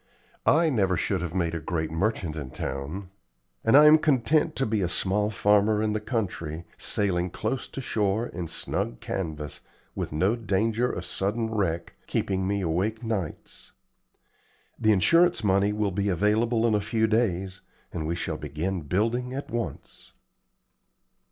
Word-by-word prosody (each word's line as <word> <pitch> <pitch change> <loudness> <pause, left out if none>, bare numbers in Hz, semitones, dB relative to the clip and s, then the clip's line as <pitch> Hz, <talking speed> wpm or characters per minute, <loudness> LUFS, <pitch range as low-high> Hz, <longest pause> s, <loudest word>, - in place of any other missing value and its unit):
I 160 +1 +4
never 95 -7 +2
should - - 0
have 90 0 -4
made 85 -3 0
a 85 - -2
great 80 -1 -3
merchant 85 -2 -1
in 70 -4 -5
town, 80 +9 -5 0.5
and 115 +5 +6
I 150 - +8
am 155 +1 +8
content 150 +3 +2
to 135 - 0
be 110 -2 0
a 90 - 0
small 100 +4 +1
farmer 105 0 +3
in 105 0 0
the 110 - 0
country, 90 -8 -3
sailing 90 -3 +1
close 130 +8 -3
to 135 - -6
shore 105 -2 0
in 90 -7 -5
snug - - -3
canvas, 75 -5 -4 0.3
with - - -4
no 95 +9 +2
danger 115 +2 0
of - - -5
sudden 110 +3 -1
wreck 85 -5 -1
keeping 95 -1 -1
me 100 0 0
awake 95 +7 -1
nights. 105 -8 -5 1.1
The 110 -1 +4
insurance 165 - +4
money 100 0 +3
will 105 -1 0
be 100 +2 0
available 110 +5 +2
in 115 - +3
a 105 - +2
few 110 +2 +1
days, 95 -4 0 0.3
and 80 -3 -3
we 85 - -1
shall 85 -2 -3
begin 80 +6 -3
building 115 - -1
at 140 - -6
once." 115 - -6
100 Hz, 160 wpm, -26 LUFS, 90-115 Hz, 1.1 s, I